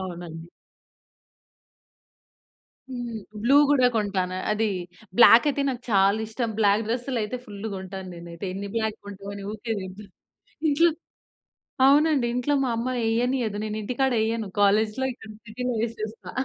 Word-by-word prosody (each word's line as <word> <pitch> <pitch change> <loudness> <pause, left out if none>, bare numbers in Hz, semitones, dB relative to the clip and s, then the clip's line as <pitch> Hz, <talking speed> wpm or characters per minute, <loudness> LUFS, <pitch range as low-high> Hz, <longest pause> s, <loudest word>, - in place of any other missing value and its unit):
అవునండి. 170 -2 -7 2.4
హ్మ్. 240 -2 -5 0.3
బ్లూ 270 +4 +4
గూడా 260 -4 +5
కొంటాను. 190 -4 -1 0.2
అది 215 +1 +1 0.5
బ్లాక్ 235 +2 +8
అయితే 285 0 -1
నాకు 250 -1 -4
చాలా 200 0 +4
ఇష్టం. 230 +1 -2
బ్లాక్ 205 +1 +3
డ్రెస్సులు 245 +1 -2
అయితే 250 +4 -4
ఫుల్లు 205 +1 -7
కొంటాను 190 0 -7
నేనైతే. 170 +2 -8
ఎన్ని 200 +1 -5
బ్లాక్ 220 -1 -1
కొంటావు 200 0 -8
అని, 200 -1 -7
ఊరికే 225 +1 -4
తిడతా, 190 +2 -8 0.6
ఇంట్లో 330 +4 +4 1.0
అవునండి 290 -2 +4
ఇంట్లో 250 +4 0
మా 250 - 0
అమ్మ 235 +2 -2 0.2
ఎయ్యనీయదు. 235 -2 0
నేను 215 0 -3
ఇంటికాడ 255 +4 0
ఎయ్యను. 220 -2 -1
కాలేజ్‌లో 215 +5 +3
ఇక్కడ 220 -2 -13 0.2
సిటీలో 250 +3 -3
వేసేస్తా. 225 -1 -5
220 Hz, 130 wpm, -25 LUFS, 200-245 Hz, 2.4 s, బ్లాక్